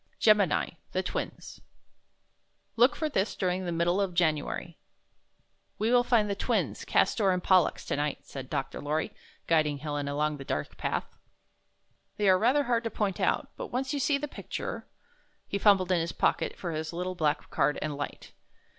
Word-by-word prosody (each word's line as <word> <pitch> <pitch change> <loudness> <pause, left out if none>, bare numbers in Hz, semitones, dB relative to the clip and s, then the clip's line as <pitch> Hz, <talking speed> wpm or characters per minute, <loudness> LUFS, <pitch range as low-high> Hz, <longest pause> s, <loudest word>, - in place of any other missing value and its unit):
GEMINI, 200 -6 +3 0.2
THE 185 - 0
TWINS 180 - -5 1.1
Look 245 +3 +5
for 315 - -1
this 210 -8 0
during 185 0 -1
the - - -1
middle 170 +3 +1
of 185 -3 -2
January 160 0 0 1.0
'We 220 +3 +1
will 245 0 +5
find 235 -4 +3
the 200 - 0
Twins, 195 - -1
Cas' - - +3
tor 200 -4 +2
and 180 -1 -1
Pol 185 -2 +6
lux, - - -6
tonight," 145 0 -2
said 135 -2 -8
Dr. 135 - -3
Lorry, 150 +2 -1 0.3
guiding 155 -3 +2
Helen 145 -1 -3
along 150 +1 0
the 135 - -7
dark 75 - -3
path. - - -3 1.0
"They 210 -1 +1
are 185 -1 +6
rather 260 +7 +3
hard 235 -2 +1
to - - 0
point 205 -4 -2
out, - - 0
but - - -5
once 265 -1 -2
you 285 - -1
see 280 +1 +2
the 295 +1 -4
picture - - -6 0.2
— - - -35
" - - -42
he 200 - -2
fumbled 195 -3 +4
in 180 - +3
his 165 +1 -3
pocket - - 0
for 175 - -4
his 155 +1 -4
little 180 +2 -3
black 155 -4 -1
card 145 +2 +2
and 155 -1 -3
hght. 145 0 -6
180 Hz, 185 wpm, -29 LUFS, 155-215 Hz, 1.1 s, Pol